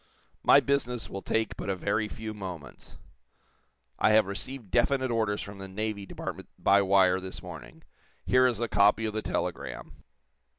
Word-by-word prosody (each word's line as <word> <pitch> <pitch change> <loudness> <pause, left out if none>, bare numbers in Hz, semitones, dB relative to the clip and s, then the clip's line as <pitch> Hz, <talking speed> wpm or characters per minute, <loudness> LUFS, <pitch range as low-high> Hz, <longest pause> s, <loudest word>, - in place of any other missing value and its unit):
"My - - +7
business 125 -4 -1
will 95 - -5
take 110 +1 -1
but - - -5
a 95 - +1
very 105 +4 -1
few 110 +1 -6
moments. 90 - -9 1.0
I - - +4
have 110 -1 +6
received 105 +3 -7
definite 130 +1 +2
orders 110 -4 0
from 100 +1 -9
the 95 - -7
Navy 100 0 -4
Department - - -7
by 100 +1 +4
wire 95 -1 +4
this 95 0 -8
morning. - - -10 0.4
Here 130 0 +5
is 120 -3 -1
a 120 - 0
copy 105 +2 +3
of 110 - -2
the 110 - -2
telegram." - - -4
105 Hz, 165 wpm, -28 LUFS, 95-115 Hz, 1.0 s, My